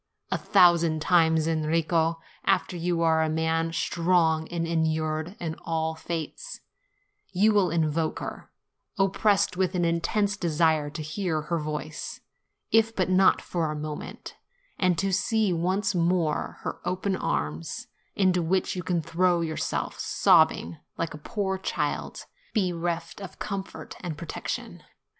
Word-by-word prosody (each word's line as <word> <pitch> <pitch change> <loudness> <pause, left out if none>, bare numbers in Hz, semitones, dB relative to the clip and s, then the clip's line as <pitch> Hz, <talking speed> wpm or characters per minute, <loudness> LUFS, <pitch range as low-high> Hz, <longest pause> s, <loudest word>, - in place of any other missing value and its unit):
A - - +2
thousand 170 -3 +4
times, 160 -2 +3
Enrico, 165 +1 +1 0.2
after - - +1
you 170 0 0
are 160 -1 +4
a 160 - +1
man, 160 +1 0
strong, 165 -2 +1
and 170 -1 -2
inured 160 +1 -1
to 160 -2 -3
all 160 -1 -1
fates, 165 - -6 0.7
you 205 +3 +3
will 200 -4 +3
invoke 160 -1 0
her, - - -7 0.5
oppressed 195 -1 +2
with 185 0 +1
an 175 -1 +2
intense 200 +5 +1
desire 160 -4 +1
to 150 +1 -6
hear 160 0 -2
her 165 +3 -2
voice, 150 0 -5 0.5
if 225 0 +3
but 185 0 +4
for 165 -3 -1
a - - -4
mo 150 0 -4
ment, - - -9 0.4
and 180 -3 +2
to 195 +2 0
see 210 +1 +2
once 185 +5 0
more 170 -3 0
her - - -4
open 190 +1 -1
arms, 75 - -3 0.3
into 185 -2 +3
which 185 +4 0
you 180 - -2
can 170 -1 -1
throw 175 +2 +2
yourself 160 -1 -2
sobbing, 85 +1 +3 0.2
like 165 - -2
a 150 - -8
poor 190 +2 -2
child - - -3 0.3
bereft 175 -2 -1
of 195 - -8
comfort 195 -2 -6
and 170 -4 -5
protection. 160 0 -5
170 Hz, 140 wpm, -27 LUFS, 160-185 Hz, 0.7 s, thousand